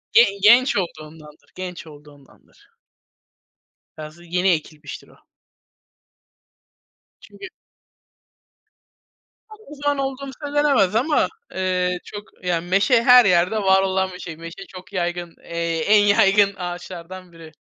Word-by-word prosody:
Ge 235 - +8 0.2
genç 240 +4 +5
olduğundandır, 155 -4 -8
genç 180 -2 -8
olduğundandır. 145 -2 -19 1.3
Biraz 155 +2 -10
yeni 180 +2 +2
ekilmiştir 155 -3 -4
o. - - -21 2.0
Çünkü 390 - -12 2.0
O 430 -9 -14
zaman 290 0 +1
olduğum 270 0 -4
söylenemez 285 -9 +1
ama, 285 +7 +1 0.3
eee, 180 -1 -1
çok, 205 -1 -12
yani, 175 -1 -2
meşe 215 +6 +3
her 250 0 +7
yerde 180 +3 +2
var 190 -1 +3
olan 190 0 -1
bir 180 - -11
şey. 165 -3 -8
Meşe 165 +4 -10
çok 185 +2 -13
yaygın, 175 -2 -4
eee, 170 -1 -3
en 205 +5 +4
yaygın 200 -1 +3
ağaçlardan 180 0 -8
biri. 165 -2 -14
185 Hz, 110 wpm, -21 LUFS, 170-215 Hz, 2.0 s, Ge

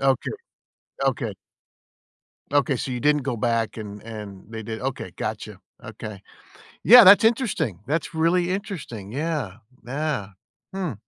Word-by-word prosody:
Okay, 135 -1 +1 0.7
okay. - - 0 1.2
Okay, 145 0 +3
so 130 - -4
you 125 - -2
didn't 150 +3 +2
go 130 -2 -2
back 115 0 0
and 105 -2 -8
and 105 -4 -9
they 110 -1 -6
did 110 +1 -6
okay, 135 0 -4
gotcha, - - -5 0.3
okay. 105 -3 -8 0.6
Yeah, 245 +1 +10
that's 200 +3 +8
interesting, 225 - +1
that's 155 +4 -2
really 175 +2 +2
interesting, 170 - -5
yeah, 140 - -3 0.3
yeah, 140 -5 -2 0.4
hmm. 185 -7 -2
135 Hz, 130 wpm, -24 LUFS, 110-165 Hz, 1.2 s, Yeah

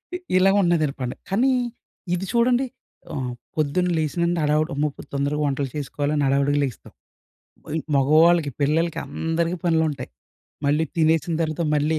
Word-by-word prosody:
ఇ - - -1 0.2
ఇలా 190 +1 +5
ఉన్నదండి 165 -6 +2
పండగ. 125 -1 -3
కానీ 235 +8 +3 0.6
ఇది 180 +2 -3
చూడండి 245 +2 +3 0.5
ఆహ్, 130 -3 -3 0.3
పొద్దున్న 155 +4 +1
లేసినుండి 170 +2 0
హడావిడి. 155 +2 +1
అమ్మో! 145 +2 +1
ఇప్పుడు - - -13
తొందరగా 140 +2 0
వంటలు 140 -1 -1
చేసుకోవాలని 145 0 -1
హడావిడిగా 140 +1 +2
లేగుస్తాం. 130 -5 -5 0.7
వోయిన్ 155 +1 -3
మగవాళ్ళకి, 155 +3 +4
పిల్లలకి, 160 +4 +1
అందరికి 165 +4 -1
పనులుంటయి. 160 -5 0 0.6
మళ్ళీ 150 +3 +2
తినేసిన 160 0 +2
తర్వాత 155 +1 -2
మళ్ళీ 150 +2 +1
155 Hz, 135 wpm, -23 LUFS, 145-170 Hz, 0.7 s, ఇలా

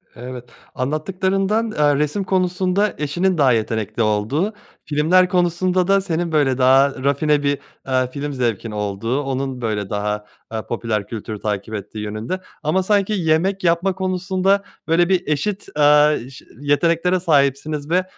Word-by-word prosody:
Evet, 125 0 -8 0.3
anlattıklarından, 190 - 0
eee, 150 -6 +2
resim 150 +7 0
konusunda 185 +2 +1
eşinin 175 +5 0
daha 140 -4 +4
yetenekli 110 -1 -1
olduğu, 110 - 0 0.3
filmler 165 +5 +3
konusunda 180 0 +1
da 195 0 +4
senin 170 -2 -2
böyle 145 -5 +2
daha 135 +1 +4
rafine 145 +1 +2
bir, 140 0 +1 0.3
eee, 130 -1 +1
film 145 +1 -4
zevkin 115 -4 -2
olduğu 105 +5 -2
onun 135 -2 -3
böyle 105 -4 -2
daha, 105 0 -2 0.3
eee, 110 - -2
popüler 110 -3 -2
kültür 110 -1 -6
takip 105 +1 -3
ettiği 105 +1 -6
yönünde 110 - -4 0.2
ama 160 +5 +1
sanki 205 +1 +1
yemek 185 +2 +1
yapma 170 +3 +2
konusunda 185 +1 0 0.2
böyle 170 +2 +3
bir 185 -1 +1
eşit, 190 +7 -2
eee, 150 0 +5
ş 130 - -13
yeteneklere 165 +5 +2
sahipsiniz 145 -2 +1
ve 180 +2 +2
150 Hz, 140 wpm, -20 LUFS, 125-185 Hz, 0.3 s, eee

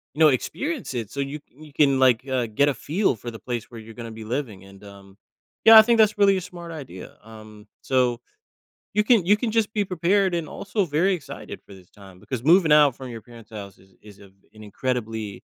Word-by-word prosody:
you - - -10
know, 155 - +8
experience 265 - -3
it, 115 -4 -5
so, 140 - -7
you 140 +2 -4
you 150 +4 -16
can, 140 -2 +3
like, 130 -1 +3
uh, 130 -3 -1
get 115 +7 +1
a - - 0
feel 170 - -1
for 120 - -7
the 115 - -9
place 120 -3 -5
where 115 - -10
you're 110 +1 -13
gonna 115 0 -8
be 110 0 -9
living, 110 -4 -5
and, 95 +1 -16
um, 100 -1 -15 0.5
yeah, 225 0 +10
I - - +12
think 235 +1 +2
that's 215 -1 +4
really 200 -1 +4
a - - -3
smart 170 -1 -10
idea, 130 - -10
um, 110 -1 -14
so, 125 -2 0 0.8
you 210 - +4
can 215 -6 +3
you 205 +3 +5
can 225 +2 -3
just 220 -1 0
be 210 -2 0
prepared 185 +1 +1
and 165 -3 -4
also 200 +4 -3
very 175 +4 +1
excited 160 -7 -9
for 100 - -13
this 90 -2 -18
time 95 -3 -16
because 125 +2 -6
moving 170 +1 +4
out 150 -3 +5
from 130 - -9
your 115 - -8
parent's 115 -2 -16
house 100 -3 -9
is 95 0 -23
is, 105 -1 -16
uh, 100 - -15 0.3
an 110 - -14
incredibly, 110 -2 -4
130 Hz, 225 wpm, -23 LUFS, 110-175 Hz, 0.8 s, I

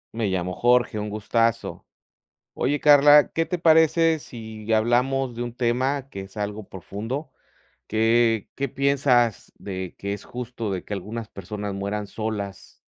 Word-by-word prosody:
Me 115 -2 0
llamo 90 -1 -2
Jorge, 120 -3 +2
un 105 - -3
gustazo. 115 +2 -1 0.7
Oye, 145 +1 0
Carla, 145 0 +7
¿qué 165 - 0
te 180 0 -3
parece 160 0 +4
si 110 -5 -6
hablamos 125 +3 +1
de 120 - -3
un 120 -1 -6
tema 130 +3 0
que 100 - -7
es 95 0 -12
algo 105 0 -4
profundo? 115 - -6 0.6
¿Qué 115 0 +2
qué 140 -1 -2
piensas 135 -4 +1
de 95 -2 -6
que 100 0 -3
es 100 - -6
justo 120 -3 -5
de 95 -2 -3
que - - -9
algunas 105 +3 -5
personas 100 +2 -6
mueran 100 +1 -3
solas? 100 - -6
115 Hz, 150 wpm, -24 LUFS, 105-135 Hz, 0.7 s, Carla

